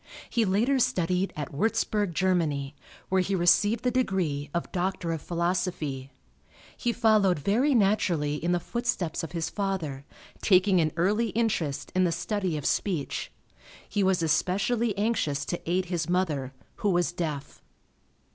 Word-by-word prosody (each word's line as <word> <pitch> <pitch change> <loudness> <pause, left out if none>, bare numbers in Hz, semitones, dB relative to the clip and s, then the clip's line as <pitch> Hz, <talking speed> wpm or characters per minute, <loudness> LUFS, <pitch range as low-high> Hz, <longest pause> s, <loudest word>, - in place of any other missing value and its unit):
He 230 -2 +2
later 230 +8 +2
studied 180 -3 +1
at 150 -2 -5
Warzburg, 205 +1 0
Germany, 155 -7 0 0.3
where 190 0 +3
he 190 +2 -1
received 205 +5 +3
the 250 - +2
degree 185 - -1
of 170 - -3
Doctor 180 -2 -1
of 160 -2 -3
Philosophy. 170 -6 -2 0.7
He 240 - -1
followed 215 -6 +3
very 235 - +2
naturally 175 -9 +1
in 175 - +1
the 175 - +2
footsteps 190 -4 -2
of 165 - -7
his 165 -1 -2
father, 185 -9 -3 0.4
taking 185 -2 +4
an 155 -1 +1
early 210 +7 +2
interest 180 - -1
in 185 0 +3
the 175 - +2
study 185 -1 -2
of 145 - -6
speech. 175 -8 -1 0.6
He 205 - -1
was 190 -3 +2
especially 200 +7 +1
anxious 200 -10 0
to 175 - -3
aid 180 +1 +1
his 175 -2 -2
mother, 155 -8 0 0.3
who 210 - 0
was 175 -2 +2
deaf. 155 -5 -5
180 Hz, 145 wpm, -27 LUFS, 165-205 Hz, 0.7 s, taking